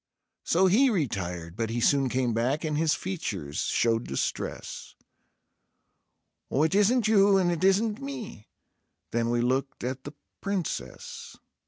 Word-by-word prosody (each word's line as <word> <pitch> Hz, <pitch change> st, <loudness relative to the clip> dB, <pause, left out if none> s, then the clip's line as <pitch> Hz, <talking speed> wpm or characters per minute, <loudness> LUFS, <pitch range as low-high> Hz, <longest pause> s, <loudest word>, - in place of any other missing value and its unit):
So 185 Hz, +3 st, +3 dB
he 230 Hz, +9 st, +5 dB
retired; 90 Hz, -, -2 dB
but 115 Hz, +1 st, -2 dB
he 115 Hz, +1 st, -2 dB
soon 135 Hz, +2 st, +3 dB
came 125 Hz, -1 st, 0 dB
back, 125 Hz, +7 st, 0 dB
and 155 Hz, -2 st, -1 dB
his 155 Hz, 0 st, +2 dB
features 100 Hz, -, -4 dB
showed 115 Hz, 0 st, +1 dB
distress: 70 Hz, -, -4 dB, 1.5 s
"Oh, 140 Hz, -, +2 dB
it 160 Hz, -, +1 dB
isn't 215 Hz, +3 st, +3 dB
you 200 Hz, -2 st, +5 dB
and 180 Hz, -2 st, +2 dB
it 170 Hz, 0 st, -2 dB
isn't 210 Hz, +4 st, +2 dB
me."... 260 Hz, -, -7 dB, 0.6 s
Then 115 Hz, 0 st, 0 dB
we 120 Hz, 0 st, +1 dB
looked 130 Hz, +2 st, -1 dB
at 130 Hz, +1 st, -3 dB
the 145 Hz, -, -8 dB, 0.3 s
Princess. 195 Hz, -5 st, -4 dB
145 Hz, 140 wpm, -27 LUFS, 115-195 Hz, 1.5 s, he